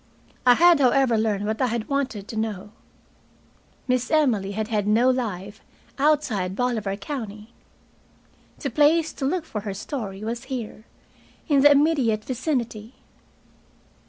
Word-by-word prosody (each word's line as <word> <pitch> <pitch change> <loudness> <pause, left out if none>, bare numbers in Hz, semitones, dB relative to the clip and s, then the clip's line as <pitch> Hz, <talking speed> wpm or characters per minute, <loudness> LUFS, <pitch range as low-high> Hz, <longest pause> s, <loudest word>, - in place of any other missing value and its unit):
I 245 - +8
had, 345 0 +6
however, 260 -2 +3
learned 215 -2 0
what 220 +3 -2
I 255 - +3
had 230 -1 -3
wanted 260 -8 -2
to - - -6
know. 210 -2 -4 1.2
Miss 250 -1 0
Emily 235 -11 +1
had 215 +1 -3
had 210 -3 -1
no 235 +5 +4
life 205 -5 -4 0.4
outside 260 -11 +1
Bolivar 220 -5 -1
County. 215 -2 -7 1.0
The 275 - -4
place 310 +4 +3
to 270 - -4
look 330 +4 -1
for 215 -9 -5
her 200 -2 -5
story 205 -3 -6
was 235 +3 -4
here, 240 -4 -6 0.6
in 285 -4 +3
the 290 - +8
immediate 280 -8 +2
vicinity. 245 -4 -3
235 Hz, 135 wpm, -24 LUFS, 210-275 Hz, 1.2 s, I